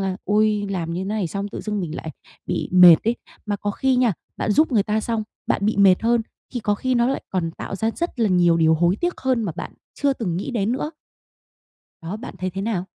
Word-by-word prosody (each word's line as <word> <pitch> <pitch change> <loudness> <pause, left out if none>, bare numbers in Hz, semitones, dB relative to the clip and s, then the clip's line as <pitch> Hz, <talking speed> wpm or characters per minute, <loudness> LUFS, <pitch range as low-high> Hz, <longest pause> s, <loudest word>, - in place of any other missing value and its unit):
là 190 -1 -1
"Ôi, 210 0 +2
làm 170 -4 -2
như 185 +2 -3
này 205 -1 -1
xong 200 +4 -4
tự - - -6
dưng 210 -2 -3
mình 165 -2 -4
lại 160 - -6 0.4
bị - - -2
mệt 180 -3 +9
ấy." 230 +2 +1 0.3
Mà 205 -1 -1
có 205 +1 -3
khi 260 +4 +1
nha, 245 -4 +3 0.2
bạn - - -1
giúp 305 +1 +3
người 210 -4 +4
ta 215 +2 0
xong, 225 0 -2 0.2
bạn 200 - 0
bị 215 - +1
mệt 195 0 +5
hơn, 235 0 +2 0.3
thì 245 - -1
có 205 -1 +1
khi 255 +4 -1
nó 240 0 +3
lại 270 - -2
còn 175 -3 -1
tạo 195 - -6
ra 220 +3 0
rất 340 -8 -3
là 220 - +3
nhiều 175 -2 +4
điều 160 -1 +4
hối 175 +4 +2
tiếc 350 0 -2
hơn 255 -3 +1
mà 180 -6 -2
bạn - - -6 0.3
chưa 280 -1 +4
từng 185 -10 -3
nghĩ 195 - -3
đến 225 -2 0
nữa. 295 +4 -2 1.1
Đó, 180 +6 -4
bạn 240 -2 -9
thấy 185 +1 -2
thế 195 +2 -5
nào? 200 -5 -1
205 Hz, 245 wpm, -22 LUFS, 185-230 Hz, 1.1 s, mệt